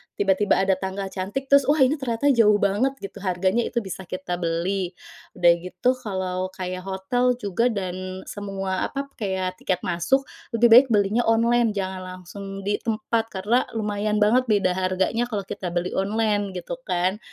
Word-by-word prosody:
tiba-tiba 200 0 +2
ada 190 -1 +2
tanggal 190 0 -4
cantik, 205 +9 -4
terus 280 -1 +6
wah, 290 -1 +5
ini 280 +3 +2
ternyata 265 +2 +1
jauh 225 -5 +5
banget, 205 +7 +1
gitu, 200 +1 -7
harganya 190 +4 0
itu 235 -1 -2
bisa 190 -1 -7
kita 180 -1 -4
beli. 175 +2 -1 0.4
Udah 175 -1 +5
gitu, 180 +7 0
kalau 185 -4 -3
kayak 185 0 -5
hotel 245 +7 +1
juga 230 0 0
dan 185 -3 -4
semua 195 -2 -3
apa, 275 0 -5
kayak 190 -3 -2
tiket 185 -1 -1
masuk, 180 +11 +1 0.3
lebih 235 0 +4
baik 250 +4 +9
belinya 215 +1 +2
online. 230 0 +3
Jangan 190 -1 -3
langsung 185 +1 -9
di 195 +1 -2
tempat, 225 0 -1
karena 210 +6 +1
lumayan 210 -1 -1
banget 240 +5 +4
beda 205 -5 +2
harganya 190 +5 0
kalau 215 -4 -3
kita 195 -1 -6
beli 175 +1 -1
online, 205 0 0
gitu 180 +8 -5
kan. 185 +2 0
200 Hz, 165 wpm, -24 LUFS, 185-230 Hz, 0.4 s, baik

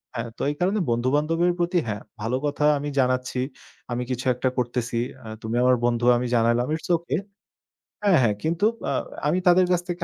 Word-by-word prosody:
হ্যাঁ, 115 0 -3
তো - - -8
এই 145 - -2
কারণে 195 +4 +1
বন্ধু 120 +2 +1
বান্ধবের 165 +4 +2
প্রতি, 175 +1 +2
হ্যাঁ, 105 -1 -3 0.2
ভালো 120 +4 0
কথা, 145 +1 0
আমি 145 +1 -3
জানাচ্ছি। 125 0 0 0.5
আমি 120 +1 -1
কিছু 125 +1 -3
একটা 125 +1 0
করতেছি। 120 -1 -1 0.3
আ - - -8
তুমি 110 +2 -3
আমার 125 0 +5
বন্ধু, 120 0 +1
আমি 125 0 -2
জানাইলাম। 115 +2 +2
ইটস 160 - -8
ওকে 170 -1 -3 0.9
হ্যাঁ, 195 -4 +5
হ্যাঁ। 105 -4 +2
কিন্তু 170 +6 +1 0.3
আ - - 0 0.3
আমি 165 +5 +2
তাদের 180 +1 +6
কাছ 175 -1 +2
থেকে 175 0 -3
130 Hz, 190 wpm, -24 LUFS, 120-170 Hz, 0.9 s, তাদের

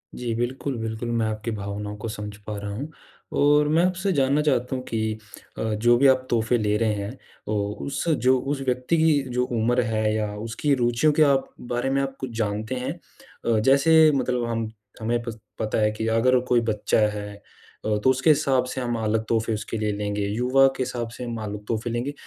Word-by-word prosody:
जी। 120 -2 -3
बिल्कुल, 125 +2 -2
बिल्कुल, 110 +1 -4
मैं 115 -1 +1
आपकी 110 +1 -3
भावनाओं 105 0 -5
को 110 +2 -5
समझ 105 -1 -6
पा 105 -1 -4
रहा 100 0 -5
हूँ। 145 +8 -5 0.5
और 145 +1 +4
मैं 160 +3 +3
आपसे 185 +2 0
जानना 140 0 +2
चाहता 130 -4 +1
हूँ 130 - -4
कि 110 -1 -1 0.4
अ, - - -2
जो 120 +3 +4
भी 135 +2 +5
आप 130 -1 +3
तोहफ़े 120 +1 +2
ले 105 -1 +1
रहे 110 -1 +1
हैं 100 +6 -5 0.3
ओ, 105 -1 -1
उस 140 +4 -3
जो 130 -4 +3
उस 135 +1 -3
व्यक्ति 125 +6 +1
की 160 -3 +4
जो 125 0 0
उम्र 120 +1 +1
है 110 -1 0
या 105 -1 -2
उसकी 115 +6 -1
रुचियों 120 +4 +2
के 155 +1 +5
आप 140 -2 +2 0.2
बारे 120 +2 0
में 135 0 +1
आप 135 0 -3
कुछ 130 - -4
जानते 110 +3 -2
हैं? 130 +4 -3 0.5
अ, 115 -2 +3
जैसे 155 +6 +5
मतलब 125 -3 0
हम 115 -1 -2 0.3
हमें 120 +1 0
पस 115 -2 -6 0.2
पता 110 0 -1
है 105 - +3
कि 110 +1 -3
अगर 125 +3 +3
कोई 120 -1 +4
बच्चा 105 +1 +1 0.2
है 105 0 -6 0.5
अ, 105 -1 +1
तो 130 - +5
उसके 130 +4 +2
हिसाब 135 -3 +3
से 130 0 -4
हम 120 -1 -1
अलग 110 +1 +1
तोहफ़े 115 0 +1
उसके 110 +1 -4
लिए 105 -1 0
लेंगे, 105 0 -2
युवा 125 +5 +4
के 130 - 0
हिसाब 120 -2 -4
से 125 - -6
हम 120 -1 -4
अलग 105 0 -6
तोहफ़े 115 +1 -2
लेंगे। 120 +5 -2
120 Hz, 210 wpm, -24 LUFS, 110-135 Hz, 0.5 s, भी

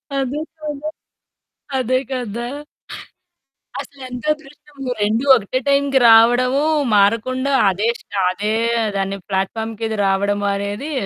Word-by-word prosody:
అదే 270 -2 0 0.3
కదా! 300 0 -5 0.9
అదే 255 0 +1
కదా! 240 -2 -3 1.3
అసలేంతదృష్టము 280 +1 -6
2 215 +4 +1
ఒకటే 240 +2 -1
టైమ్‌కి 280 -1 +3
రావడము, 245 +4 +5 0.3
మారకుండా 230 +7 +2 0.2
అదే 200 +4 -1
స్ట - - -24 0.2
అదే 205 +3 -2 0.4
దాన్ని 195 0 -2
ప్లాట్‌ఫార్మ్‌‌కిది 220 +3 -2
రావడము 200 +1 0
అనేది 205 +9 -4
240 Hz, 90 wpm, -19 LUFS, 205-275 Hz, 1.3 s, రావడము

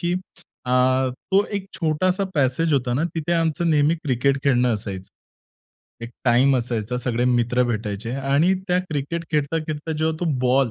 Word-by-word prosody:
की 175 0 0
अ, 180 -8 -9 0.4
तो 195 +10 0
एक 195 -1 -5
छोटासा 180 +5 +1
पॅसेज 145 +3 +1
होता 125 -3 +1
ना, 145 - 0
तिथे 165 +1 -2
आमचं 165 0 +1
नेहमी 150 +1 +3
क्रिकेट 135 +1 +1
खेळणं 125 -3 +3
असायचं. 95 -2 -6 1.0
एक 115 - -8
टाईम 130 +2 +4
असायचा, 120 -1 -2
सगळे 125 -1 -1
मित्र 125 0 +2
भेटायचे 110 -1 -3
आणि 140 +7 +2 0.2
त्या 180 0 +3
क्रिकेट 165 0 -4
खेळता-खेळता 155 +1 -2
जेव्हा 160 0 0
तो 175 - 0 0.2
बॉल 130 0 +2
140 Hz, 150 wpm, -22 LUFS, 125-165 Hz, 1.0 s, टाईम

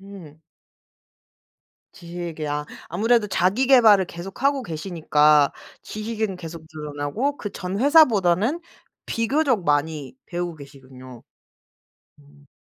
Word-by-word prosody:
음. 190 -6 -13 1.5
지식이요. 165 -4 -5 0.2
아무래도 220 +5 +2
자기계발을 210 +1 +4
계속 175 +6 -9
하고 275 -1 +2
계시니까 155 - +2 0.3
지식은 215 -2 -4
계속 165 -2 -9
늘어나고 150 - -3
그 205 - -5
전 185 0 -5
회사보다는 240 - +4 0.5
비교적 250 - 0
많이 150 - -1
배우고 175 -1 -4
계시군요. 130 -3 -13 1.0
음. 145 0 -22
175 Hz, 245 characters per minute, -23 LUFS, 150-220 Hz, 1.5 s, 자기계발을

